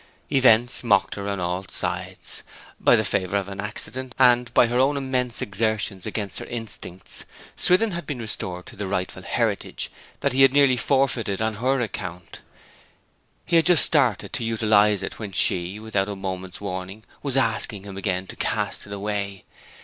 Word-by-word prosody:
Events 120 -3 +4
mocked 100 -5 +3
her 100 0 -4
on 100 -1 -2
all 90 +1 -2
sides. 90 +1 -4 0.4
By - - +5
the - - +1
favour 95 0 0
of 100 -1 -2
an 100 0 -7
accident, 120 +4 -5
and 125 -2 +4
by - - +7
her 120 +2 0
own 140 +2 +3
immense 130 -3 -1
exertions 105 -1 -1
against 105 -3 -3
her - - -6
instincts, 115 -6 -7 0.3
Swithin 185 +5 +3
had 170 -3 -5
been 145 - -3
restored 95 -6 -4
to - - -11
the 100 -1 -4
rightful 95 -1 -3
heritage - - -1 0.3
that - - +1
he 135 - +3
had 135 -1 +7
nearly 140 -2 +5
forfeited 125 -6 +1
on 110 0 0
her 130 +4 +1
account. 90 -6 -5 1.1
He 170 -1 +3
had 165 - +3
just 175 -3 +7
started 130 - +2
off - - -2
to - - -4
utilize 105 -3 +3
it; - - -5
when 105 -4 -6
she, 90 +2 0
without 105 -3 -1
a 100 - -3
moment's 95 -1 -5
warning, 95 +1 -6 0.2
was 135 -2 -1
asking 110 -5 0
him 100 -1 -8
again 95 -1 -1
to - - -10
cast - - -2
it 100 - -7
away. 100 -1 -3
105 Hz, 180 wpm, -24 LUFS, 95-125 Hz, 1.1 s, by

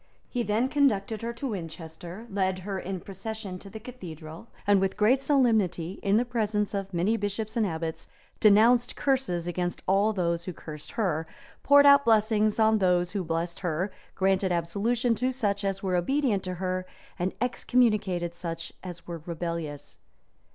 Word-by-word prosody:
He 245 - -2
then 225 +2 +1
conducted 225 -7 +1
her 230 +1 -2
to 255 +3 -4
Winchester, 170 +1 -7
led 190 -1 0
her 195 -2 -3
in 185 -1 -5
procession 195 -1 -6
to 195 - -11
the 220 - -8
cathedral, 175 -6 -9 0.2
and 200 -1 +4
with 195 0 0
great 240 +6 +4
solemnity, 220 - +2
in 200 +1 +3
the 240 - +2
presence 215 -4 -1
of 195 -1 -3
many 185 +6 +1
bishops 210 +2 -3
and 225 -3 +2
abbots, 165 -1 -4 0.3
denounced 230 +3 +5
curses 250 -12 0
against 175 0 -2
all 200 +3 +3
those 170 -4 -1
who 185 - -4
cursed 150 -2 -9
her, 165 -7 -1 0.3
poured 285 0 +6
out 280 0 +8
blessings 215 -1 +3
on 220 -1 +4
those 180 -2 +2
who 200 -2 -2
blessed 170 +1 -2
her 180 +2 -1 0.2
granted 190 0 +2
absolution 210 +8 +1
to 250 +4 0
such 205 -6 -1
as 195 0 -2
were 185 -2 0
obedient 225 +3 +1
to 185 0 -3
her, 185 0 -2 0.3
and 180 +2 -1
excommunicated 210 -8 +1
such 165 -1 -6
as 175 -2 -8
were 170 -2 -6
rebellious. 170 -3 -5
195 Hz, 165 wpm, -27 LUFS, 175-225 Hz, 0.3 s, out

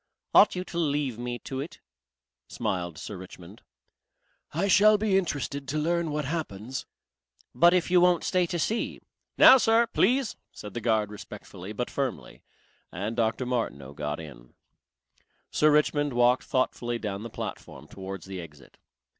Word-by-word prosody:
"Ought 205 - +7
you 180 - -2
to 170 -2 -5
leave 145 -6 -1
me 120 0 -3
to 130 +2 -6
it?" 145 +5 -7 0.7
smiled 85 -3 -3
Sir 105 - -7
Richmond. 95 +2 -12 0.9
"I 175 +6 0
shall 210 +2 +6
be 210 -2 +1
interested 145 -6 -1
to 150 - -2
learn 170 +2 0
what 150 -1 -2
happens." 130 - -4 0.7
"But 175 +2 +5
if 180 0 0
you 180 -1 +6
won't 180 -1 +4
stay 180 -2 +1
to 175 - -3
see!" 220 +7 -1 0.4
"Now 265 - +9
Sir, 230 0 +4
please," 250 +1 +1
said 105 -2 -10
the 120 - -4
guard 110 -2 +1
respectfully 100 -2 -9
but 120 +3 -4
firmly, 135 -3 -4 0.5
and 105 +6 -4
Dr. 115 +2 0
Martineau 70 - -3
got 75 +1 -4
in. 65 -7 -12 1.0
Sir 155 - +4
Richmond 145 -1 +2
walked 120 +1 +3
thoughtfully 120 -2 -1
down 105 -3 -4
the 115 - -6
platform - - -7
towards 95 -2 -8
the 95 -1 -6
exit. 75 -4 -14
130 Hz, 155 wpm, -27 LUFS, 100-170 Hz, 1.0 s, Now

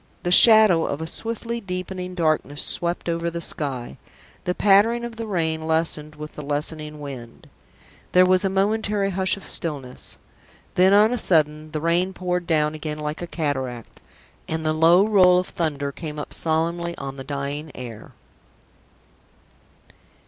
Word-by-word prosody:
The 175 - -1
shadow 215 -4 +7
of 140 - -3
a 160 - -4
swiftly 230 +6 -3
deepening 185 -1 -5
darkness 155 -3 0
swept 175 0 -3
over 170 0 -1
the 170 0 -5
sky. 135 - -3 0.5
The 180 - -1
pattering 220 +4 +3
of 235 -1 -8
the 225 -1 -5
rain 160 -5 -1
lessened 160 -2 -1
with 150 0 -9
the - - -8
lessening 150 +1 -4
wind. 130 -5 -9 0.7
There 180 0 +6
was 185 +1 +3
a 195 - +1
momentary 200 +1 0
hush 190 +1 0
of 195 - -12
stillness. 140 -7 -3 0.6
Then 185 +1 +4
on 210 +4 +5
a 245 - 0
sudden 155 -4 +1
the 155 -1 -4
rain 175 +3 +1
poured 180 -1 -3
down 150 -2 +1
again 155 0 -5
like 150 +2 -5
a 175 - -5
cataract, 130 -8 -4 0.5
and 160 0 -3
the 155 - +1
low 170 +5 +5
roll 185 -4 +5
of 180 - -1
thunder 145 -4 -2
came 155 0 -7
up 150 - -6
solemnly 170 +2 -1
on 135 0 -7
the 135 - -7
dying 140 +2 -5
air. 115 -4 -9
165 Hz, 155 wpm, -23 LUFS, 150-185 Hz, 0.7 s, shadow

